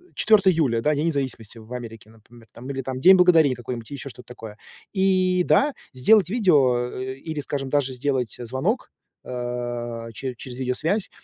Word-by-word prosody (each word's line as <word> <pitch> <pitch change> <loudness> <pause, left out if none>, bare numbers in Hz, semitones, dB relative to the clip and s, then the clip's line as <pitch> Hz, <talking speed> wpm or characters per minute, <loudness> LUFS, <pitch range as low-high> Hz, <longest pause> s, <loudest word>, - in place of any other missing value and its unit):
4 205 -3 +4
июля, 130 -9 +1
да, 150 +4 +2
День 155 +3 0
независимости 130 -7 -4
в 110 +2 -15
Америке, 115 -3 -8
например, 115 +1 -19 0.3
или 135 - -2
там 130 0 -5
День 190 +7 +8
благодарения 165 -7 +5
какой-нибудь 120 -1 -7
и - - -5
еще 140 0 -6
что 125 - -12
то - - -52
такое. 110 -3 -10 0.3
И, 185 -2 +2
да, 290 0 +3 0.2
сделать 185 +8 +4
видео 140 - +2
и 130 +4 -7
или, 155 -2 -3
скажем, 135 -1 -4
даже 135 -2 0
сделать 125 -3 -2
звонок, 130 - -2 0.3
а, 120 -2 -5
чере 130 +3 -5
через 125 -1 -8
видеосвязь, 155 - -1
130 Hz, 170 wpm, -23 LUFS, 120-165 Hz, 0.3 s, День